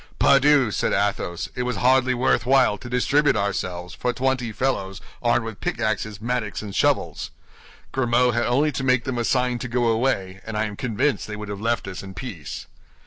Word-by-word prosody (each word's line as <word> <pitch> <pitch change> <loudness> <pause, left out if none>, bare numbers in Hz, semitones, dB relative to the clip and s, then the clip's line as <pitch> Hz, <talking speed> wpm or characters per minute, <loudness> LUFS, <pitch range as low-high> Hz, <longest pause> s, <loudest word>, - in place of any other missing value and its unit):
"Pardieu!" 140 -3 +5
said - - 0
Athos, 100 -4 -1
"it - - -3
was 125 -1 -1
hardly 130 +2 +3
worth 120 -2 +2
while 130 -5 +4
to 120 - -10
distribute 140 +4 +2
ourselves 90 -3 -2
for 125 - -1
twenty 125 -2 -1
fellows 100 -6 -2 0.2
armed 120 -1 +2
with 110 -3 -7
pickaxes, 110 -2 -2
mattocks, 115 -2 -2
and 100 -2 -7
shovels. - - +1 0.6
Grimaud 125 -1 +2
had 120 +1 +1
only 145 +5 +2
to 135 - -4
make 125 -2 +3
them 130 -2 -3
a - - 0
sign 125 0 +1
to 125 - -4
go 120 -1 +1
away, 110 -5 0
and 110 -1 -5
I 110 - +1
am 105 -1 -5
convinced 125 +5 -1
they 105 - -5
would 105 0 -7
have 100 0 -5
left 115 -2 0
us 95 -2 -6
in 95 -1 -10
peace." 90 - -7
120 Hz, 195 wpm, -23 LUFS, 105-125 Hz, 0.6 s, Pardieu